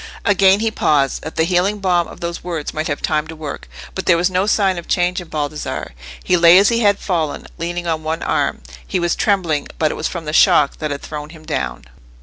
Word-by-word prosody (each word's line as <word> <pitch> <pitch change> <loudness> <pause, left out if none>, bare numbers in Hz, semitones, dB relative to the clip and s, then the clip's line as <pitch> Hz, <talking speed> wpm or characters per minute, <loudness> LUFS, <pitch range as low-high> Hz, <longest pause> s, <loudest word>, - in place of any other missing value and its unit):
Again 195 0 +4
he 225 0 +1
paused, 140 -9 +1
that 160 - -7
the 160 - +2
healing 185 +4 +1
balm 180 -4 +1
of - - -13
those 170 0 -4
words 165 -4 -4
might 155 +1 -2
have 145 - -3
time 155 0 0
to 160 - -8
work. 155 -2 -7 0.2
But 190 - -5
there 170 - +5
was 180 +2 +1
no 185 +2 +1
sign 195 -4 +2
of 170 - -11
change 180 +1 +1
in 175 - -11
Baldassarre: 150 0 -4 0.3
he 180 - +2
lay 170 +1 +7
as 195 +1 +5
he 235 - +1
had 205 -3 +3
fallen, 165 -8 -2
leaning 175 +1 -3
on 160 -2 -1
one 160 +1 -3
arm: - - 0 0.3
he - - -1
was 175 -1 0
trembling, 175 -8 0
but 155 -1 +1
it - - -4
was - - -2
from 170 -3 -6
the 150 - -4
shock 145 -2 +4
that 155 - -2
had 145 -1 -5
thrown 150 -1 -7
him 155 -1 -14
down. - - -3
170 Hz, 235 wpm, -19 LUFS, 155-185 Hz, 0.3 s, lay